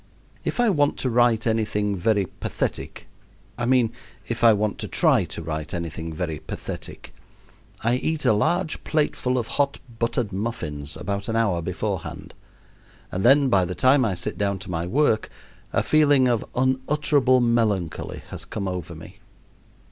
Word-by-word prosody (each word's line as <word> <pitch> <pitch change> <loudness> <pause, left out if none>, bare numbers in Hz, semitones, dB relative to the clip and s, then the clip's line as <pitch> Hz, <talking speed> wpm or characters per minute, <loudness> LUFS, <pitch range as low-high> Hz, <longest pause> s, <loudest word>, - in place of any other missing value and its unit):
If - - -3
I 240 -3 +4
want 145 -5 +2
to 130 - 0
write 120 -1 +3
any 110 -1 +2
thing 105 -1 -1
very 100 +1 +1
pathetic - - -4 0.5
I 120 0 -2
mean, 125 -3 +3 0.4
if 115 0 -3
I 115 - +8
want 105 0 0
to - - -4
try - - +3
to 85 - -7
write 80 -1 -4
anything 80 -1 -4
very 80 -1 -3
pathetic - - -7 0.7
I 120 +2 +2
eat 160 +3 -2
a - - +5
large 170 - 0
plateful 145 -4 0
of 120 - 0 0.2
hot 140 0 0 0.2
buttered 115 -2 0
muffins 75 -9 -4
about 100 +2 -3
an 115 - -1
hour 100 -7 +1
beforehand, 95 +1 -4 0.8
and 95 - -2
then 140 +3 +6
by 100 -7 +4
the 90 +1 -3
time 130 +1 +4
I 105 -6 0
sit 90 - -4
down 100 -1 0
to 95 - -7
my 85 0 -2
work 120 0 +2 0.4
a - - +1
feeling 145 -4 +4
of 120 -3 +1
unutterable 130 0 +2
melancholy 110 -8 0
has - - -7
come 100 - -4
over 90 -3 -4
me. - - -12
110 Hz, 165 wpm, -24 LUFS, 95-130 Hz, 0.8 s, I